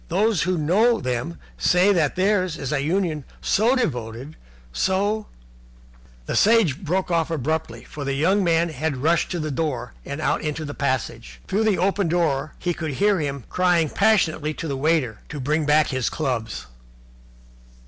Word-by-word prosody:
Those 200 +2 +1
who 185 +1 0
know 210 +10 +3
them 125 +5 -3 0.2
say 185 +3 +4
that 160 -6 +1
theirs 185 -3 +1
is 135 -1 -4
a 140 - 0
union 160 -1 -1 0.2
so 225 +6 +2
devoted, 125 - -3 0.4
so 205 - 0 0.5
" - - -26
The - - -3
Sage 205 - +3
broke 180 +2 -1
off 165 -1 +1
abruptly, 155 -5 -2
for 145 - -8
the 140 0 -2
young 190 +8 +2
man 170 -1 +2
had 155 -1 -2
rushed 160 +5 +1
to 175 - -3
the 155 -1 -3
door 130 -5 -3
and 140 +2 -6
out 155 - 0
into 155 0 -3
the 145 - -6
passage. 130 - -3
Through 215 +3 +1
the 210 -4 +2
open 195 +1 +1
door 155 -4 0
he 175 0 -1
could 160 -3 -4
hear 200 +5 +2
him 140 -3 -3
crying 175 -3 +2
passionately 160 -8 +2
to 165 - -5
the 140 - -2
waiter 135 -6 0
to 150 - -6
bring 150 +3 0
back 150 0 +4
his 130 -3 -1
clubs. 120 - -3
160 Hz, 170 wpm, -23 LUFS, 140-185 Hz, 0.5 s, say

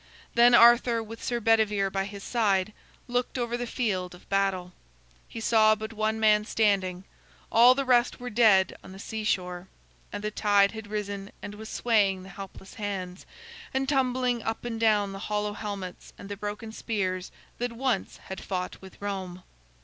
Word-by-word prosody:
Then 240 +1 +6
Arthur, 235 0 +6
with 225 +1 -10
Sir 240 -1 -1
Bedivere 210 -3 +2
by 195 0 -1
his 200 0 -8
side, 210 -4 +1 0.3
looked 245 +1 -1
over 240 -1 -1
the 245 0 -3
field 185 -8 -2
of 180 - -18
battle. 195 -2 0 0.5
He - - -8
saw 220 -1 +4
but 220 +1 -7
one 220 0 -1
man 210 -1 +4
standing; 195 -5 +1 0.5
all 245 +3 +7
the 275 0 -1
rest 245 -1 +3
were 245 0 -6
dead 210 -4 +4
on 190 - -11
the - - -10
seashore. 190 -4 -3 0.4
And 205 - -5
the 210 - -2
tide 205 -2 +3
had 220 -2 -8
risen, 205 -1 -4
and 205 - -6
was 215 +1 -9
swaying 200 -5 +1
the 190 - -11
helpless 195 0 -10
hands, 195 -5 -5 0.5
and 265 0 +1
tumbling 255 -3 +1
up 225 +2 -4
and 230 -2 -3
down 210 -3 +3
the 195 - -7
hollow 210 0 -1
helmets 200 -4 -7
and 200 - -10
the 205 - -4
broken 210 +2 -6
spears 190 -5 -3 0.3
that 245 0 -1
once 240 -4 -1
had 190 - -7
fought 180 -2 -4
with 190 -1 -13
Rome. 190 -3 -5
210 Hz, 170 wpm, -27 LUFS, 195-230 Hz, 0.5 s, all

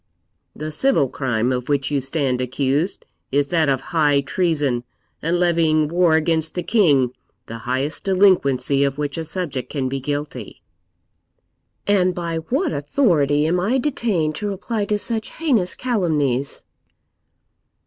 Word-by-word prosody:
The 155 +1 -5
civil 260 - +3
crime 120 -3 -1
of 125 0 -3
which 140 0 0
you 140 -2 +1
stand 135 -2 0
accused 140 +7 -1 0.3
is 140 +1 +1
that 160 -4 +2
of 135 -1 +1
high 145 -3 +3
treason 145 -5 0 0.4
and 170 +3 0
levying 165 -3 +2
war 170 -1 +3
against 160 0 0
the 180 - -2
king, 145 - +3 0.3
the 115 0 -8
highest 135 +8 -2
delinquency 140 -9 +3
of 140 0 -1
which 145 -2 -3
a - - -3
subject 160 -6 -4
can 135 -3 -2
be 135 +1 -3
guilty.' 145 -4 -5 1.2
'And 185 -3 +2
by 170 -2 -3
what 270 - -1
authority 150 - +2
am 175 +3 +1
I 215 +9 +1
detained 225 - 0
to 210 - -3
reply 205 +2 -3
to 210 +1 0
such 225 +1 -2
heinous 245 - +1
calumnies?' 150 - -1
155 Hz, 140 wpm, -21 LUFS, 140-180 Hz, 1.2 s, civil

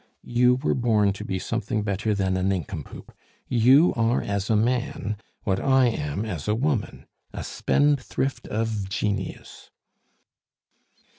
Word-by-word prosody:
You 125 +1 +3
were 130 +4 0
born 110 -5 +2
to 95 - -7
be 95 - -2
something 115 +2 -2
better 105 +1 -1
than 95 -2 0
a 95 - -1
nincompoop; 90 -4 -4 0.4
you 130 +8 +5
are 115 +1 +2
as 100 0 -2
a 110 - +3
man 120 0 0 0.3
what 95 -2 0
I 130 -2 +4
am 75 -1 -3
as 90 -8 -5
a 105 - +2
woman 130 -1 -2 0.3
a - - -5
spendthrift 135 -3 0
of 110 -3 -2
genius." 100 +1 -4
110 Hz, 135 wpm, -25 LUFS, 100-125 Hz, 0.4 s, you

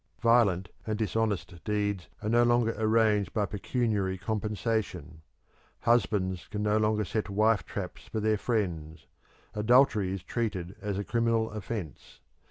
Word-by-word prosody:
Violent 105 -6 +4 0.2
and 110 -1 -1
dishonest 105 -6 -2
deeds 100 -2 -1
are 105 - -1
no 120 +1 +4
longer 120 -1 +3
arranged 110 -4 +2
by 105 -2 +1
pecuniary 105 -2 -1
compensation. 105 -5 -3 0.6
Husbands 100 -6 +1
can 105 0 -4
no 105 0 +2
longer 105 0 +1
set 110 +2 -2
wife 110 +2 +2
traps 95 -3 -6
for 110 - -3
their 110 0 +1
friends; 85 - -2 0.5
adultery 110 -3 +4
is 95 -2 -4
treated 100 -6 -3
as 100 -2 -2
a 100 - -2
criminal 115 0 +1
offence. 105 -6 -6
105 Hz, 135 wpm, -29 LUFS, 95-115 Hz, 0.6 s, Violent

